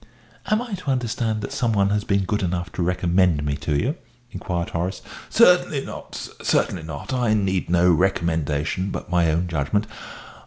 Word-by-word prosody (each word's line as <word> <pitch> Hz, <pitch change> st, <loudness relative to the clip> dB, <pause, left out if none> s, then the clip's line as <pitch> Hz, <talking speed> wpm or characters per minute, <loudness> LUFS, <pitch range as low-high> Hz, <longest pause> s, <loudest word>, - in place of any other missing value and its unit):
"Am 215 Hz, +3 st, +2 dB
I 240 Hz, -4 st, -8 dB
to 180 Hz, -6 st, -4 dB
understand 115 Hz, -4 st, -1 dB
that -, -, -5 dB
some 115 Hz, -2 st, 0 dB
one 100 Hz, -1 st, +2 dB
has 105 Hz, 0 st, +1 dB
been 100 Hz, -1 st, +1 dB
good 105 Hz, +3 st, -1 dB
enough 90 Hz, 0 st, -2 dB
to -, -, -4 dB
recommend 90 Hz, -3 st, +2 dB
me 70 Hz, -1 st, 0 dB
to 75 Hz, -2 st, -1 dB
you?" 140 Hz, -, -1 dB, 0.3 s
inquired 90 Hz, -2 st, -3 dB
Horace. 90 Hz, +3 st, -3 dB, 0.3 s
"Certainly 180 Hz, -9 st, +4 dB
not, -, -, -9 dB
sir, -, -, -7 dB
certainly 90 Hz, -, +1 dB
not. 80 Hz, -, -6 dB
I 120 Hz, -4 st, +2 dB
need 95 Hz, -4 st, 0 dB
no 90 Hz, +1 st, +4 dB
recommendation 85 Hz, -1 st, 0 dB
but 90 Hz, -, -6 dB
my 85 Hz, -2 st, +3 dB
own 85 Hz, +3 st, 0 dB
judgment. 85 Hz, +6 st, 0 dB
95 Hz, 180 wpm, -23 LUFS, 85-110 Hz, 0.3 s, Certainly